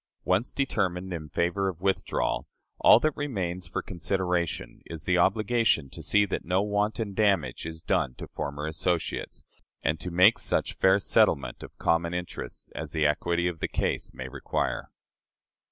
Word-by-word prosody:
Once 95 +6 +2
determined 95 -9 -1
in 80 -3 -6
favor 90 +6 0
of 85 -3 -7
withdrawal, 95 +1 0 0.3
all - - +8
that 155 +2 +1
remains 95 - -3
for 85 - -3
consideration 90 -7 -2
is 80 -3 -7
the 90 +2 +2
obligation 105 - +2
to - - -8
see 105 0 +3
that 95 - -3
no 90 +3 +1
wanton 105 0 -1
damage 100 -6 +1
is 80 0 -8
done 65 - 0
to - - -7
former 75 -1 -4
associates, 80 +2 -2 0.4
and 80 +2 +1
to 90 - -3
make 90 +6 +5
such - - 0
fair 95 +1 +4
settlement 70 -9 +2
of - - -11
common 85 +1 +1
interests 90 0 -6
as - - -6
the 80 -2 +1
equity 85 +3 +1
of 85 -2 -3
the - - -1
case - - -1
may 65 - -7
require. 65 - -2
90 Hz, 160 wpm, -28 LUFS, 80-100 Hz, 0.4 s, all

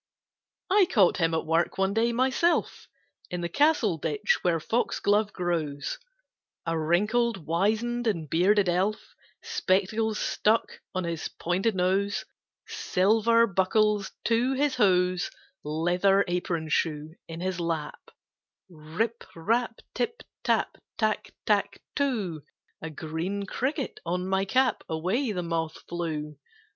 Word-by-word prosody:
III. - - +5
I - - +7
caught 195 - +4
him 165 -2 +1
at 160 - -1
work 165 +2 +1
one 190 +1 +1
day, 230 +2 +2
myself, 260 +8 +1 0.4
In 180 -1 -3
the 170 - -1
castle 255 - +2
ditch 435 - +1
where 170 -2 +2
foxglove 210 +1 +1
grows, 160 -5 -2 0.7
A 165 -1 0
wrinkled, 200 +5 +1
wizen'd, 220 +8 0
and 170 -8 -1
bearded 190 +6 +3
Elf, 185 +5 0 0.3
Spectacles 220 - 0
stuck 220 +2 +1 0.2
on 185 - 0
his 170 -2 -3
pointed 190 +5 -1
nose, 190 +2 +1 0.4
Silver 225 +4 +3
buckles 205 +1 +1
to 235 +3 +2
his 285 +1 +1
hose, 180 -5 +2 0.3
Leather 180 +6 +2
apron 175 -2 -2
shoe 155 0 -1
in 165 0 -7
his 185 0 -2
lap 165 -3 -3 0.6
"Rip 180 +9 -3
rap, 230 +7 0
tip 460 0 -2 0.2
tap, - - 0 0.2
Tack 215 -1 0
tack - - +1 0.2
too! 215 - -1 0.4
(A 160 - -5
green 160 +6 -4
cricket 265 - -2
on 180 +2 -2
my 190 0 +1
cap! 255 +5 +2
Away 185 - 0
the 180 -3 -2
moth 165 -1 -2
flew!) 155 -4 -4
190 Hz, 125 wpm, -27 LUFS, 170-225 Hz, 0.7 s, I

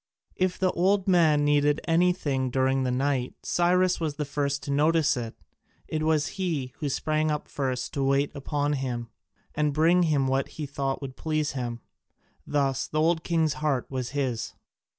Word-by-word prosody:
If 185 0 0
the 185 -1 +2
old 190 +2 +1
man 160 -5 +4
needed 145 0 +3
anything 165 -6 +1
during 130 +1 +1
the 130 -1 0
night 130 -1 -1
Cyrus 180 +1 +2
was 155 -3 -2
the 150 - -3
first 140 -1 -2
to 140 - -4
notice 150 +1 +3
it, 115 -2 -5 0.5
it 155 - -2
was 155 -1 +2 0.2
he 145 -9 -2
who 150 - -2
sprang 155 +3 0
up 150 -1 -2
first 130 -3 -3
to 140 - -1
wait 140 +1 +2
upon 145 +1 -1
him, 125 -4 -3 0.4
and 150 -1 0
bring 170 +3 +4
him 150 -5 +2
what 135 +1 0
he 155 - -3
thought 140 0 -3
would 130 -1 -6
please 155 -2 -1
him. 120 -3 -4 0.7
Thus 135 -2 0
the 155 - -2
old 160 +1 +2
king's 160 -3 +1
heart 140 -5 0
was 130 -2 -3
his. 130 -6 -2
145 Hz, 170 wpm, -27 LUFS, 135-160 Hz, 0.7 s, man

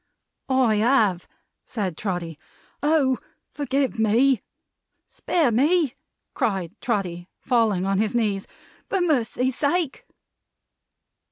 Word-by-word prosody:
"I 255 -5 +3
have!" 215 -6 +2 0.4
said 195 -8 -3
Trotty. 170 -5 -4 0.4
"Oh, 290 -4 +2 0.3
forgive 275 -4 -1
me!" 230 +3 +3 0.6
"Spare 315 -8 0
me," 290 +4 +2 0.4
cried 190 -6 -1
Trotty, 180 -6 -2
falling 225 -7 +1
on 195 0 +1
his 215 +2 0
knees; 205 -4 0 0.4
"for 390 - +1
Mercy's 260 -6 +1
sake!" 305 0 -1
235 Hz, 95 wpm, -24 LUFS, 195-275 Hz, 0.6 s, I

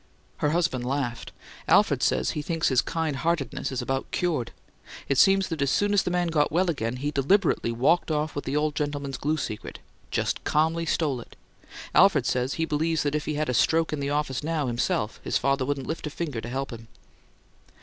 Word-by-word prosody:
Her 150 - +1
husband 160 -6 0
laughed. 125 -2 -3 0.4
"Alfred - - +4
says 65 0 +1
he 150 - -3
thinks 165 +1 0
his 130 -2 +4
kind 160 -4 -2
heartedness 160 -4 -1
is 130 - -2
about 135 0 -2
cured! 160 -9 -1 0.6
It 140 -1 +1
seems 195 -1 +5
that 160 -4 -3
as 140 - +2
soon 205 +7 +2
as 200 - +4
the - - -2
man 175 -1 0
got 150 -3 +2
well 175 +2 +2
again 115 -5 -3
he 145 +3 -2
deliberately 145 - +2
walked 135 +11 +2
off 155 0 -1
with 145 - -4
the 135 - -2
old 150 0 +1
gentleman's 145 -2 -3
glue 155 +2 0
secret. 110 -7 -5 0.3
Just - - -1
calmly 160 +2 +1
stole 145 -7 0
it! - - -15 0.6
Alfred 155 -10 +5
says 125 +2 0
he 165 - 0
believes 160 +1 0
that 145 -1 -1
if 150 -1 -1
he 150 - -2
had 155 +1 -1
a 125 - 0
stroke 160 +8 +2
in 150 - -2
the 140 0 -2
office 145 -4 -1
now, 155 -2 -1
himself, 120 -3 -1
his - - +1
father 135 -1 0
wouldn't 140 -2 -2
lift 160 -1 -4
a - - -3
finger 145 -6 -4
to 120 - -7
help 135 +2 -3
him!" 115 0 -10
145 Hz, 210 wpm, -26 LUFS, 130-160 Hz, 0.6 s, seems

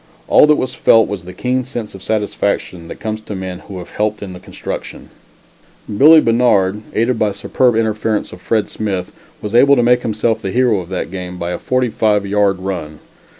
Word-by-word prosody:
All - - +6
that 150 - +5
was 130 -3 -3
felt 115 -1 +4
was 95 -4 -6
the 90 - -8
keen 125 +7 -1
sense 120 -4 -6
of 95 - -11
satisfaction 100 -5 -2
that - - -9
comes 110 0 -4
to 105 -1 -7
men 95 -1 -6
who 95 -1 -10
have 90 - -9
helped 105 0 -2
in 95 -2 -7
the 90 - -10
construction. - - -7 0.8
Billie 155 +7 +7
Bannard, 105 -5 +2
aided 115 +1 +1
by 105 -2 +1
superb 120 +4 +1
interference 110 -1 -1
of 90 - -12
Fred 110 +1 0
Smith, 95 -4 -4 0.3
was 105 0 -4
able 140 +4 +6
to 120 - +2
make 125 +1 +3
himself 110 0 -1
the 95 - -3
hero 120 -1 +2
of 90 -1 -8
that 90 -2 -4
game 90 -1 -6
by 85 0 -4
a 90 - -4
forty 130 -1 0
five 105 -2 +1
yard 100 -1 +1
run. 90 -5 -5
105 Hz, 200 wpm, -17 LUFS, 95-120 Hz, 0.8 s, Billie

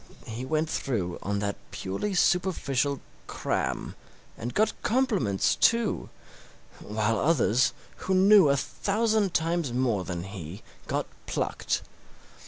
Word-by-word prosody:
He 115 +3 -5
went 155 +3 0
through 105 - -2
on 100 +1 -1
that 100 -1 -2
purely 100 - -3
superficial 145 -7 +1 0.3
'cram', - - -2 0.4
and 120 +3 -5
got 215 - +2
compliments, 210 - +2
too, 230 -2 +2 0.7
while 105 +1 -1
others, 125 -6 +3 0.3
who 190 - -1
knew 195 -3 +7
a 140 - +3
thousand 210 +4 0
times 165 -3 +1
more 120 -6 +1
than 85 -2 -4
he, 95 0 -8 0.2
got - - -1 0.2
plucked. - - -1
135 Hz, 115 wpm, -27 LUFS, -, 0.7 s, knew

